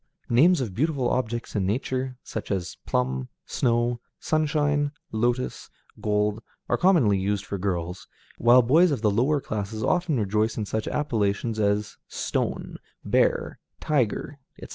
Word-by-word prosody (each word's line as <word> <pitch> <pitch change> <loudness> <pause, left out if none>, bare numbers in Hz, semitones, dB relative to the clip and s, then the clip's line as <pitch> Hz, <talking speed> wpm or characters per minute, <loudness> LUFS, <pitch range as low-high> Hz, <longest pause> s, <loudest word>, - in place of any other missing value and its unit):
Names 160 +7 +5
of 110 -7 -3
beautiful 140 - 0
objects 120 -2 -2
in 95 -3 +1
nature, 130 +3 -2
such - - -6
as 95 -4 -2
Plum, 65 0 -1 0.2
Snow, 120 -1 +1 0.2
Sunshine, 145 -2 +1 0.2
Lotos, 120 +3 -1 0.3
Gold, 105 +1 0 0.3
are - - +2
commonly 145 - +4
used 100 +1 -1
for 100 - -4
girls, 90 -2 -3 0.3
while 120 +1 +6
boys 160 +9 +5
of 135 -7 -2
the 105 - +4
lower 130 +8 +2
classes 110 -2 -4
often 175 -7 +1
rejoice 105 +2 0
in 110 - -1
such 110 +1 -3
appellations 110 -5 -1
as 105 0 0
Stone, - - -3 0.3
Bear, - - +1 0.2
Tiger, 140 0 -1 0.2
etc. - - -9
115 Hz, 140 wpm, -25 LUFS, 105-140 Hz, 0.3 s, while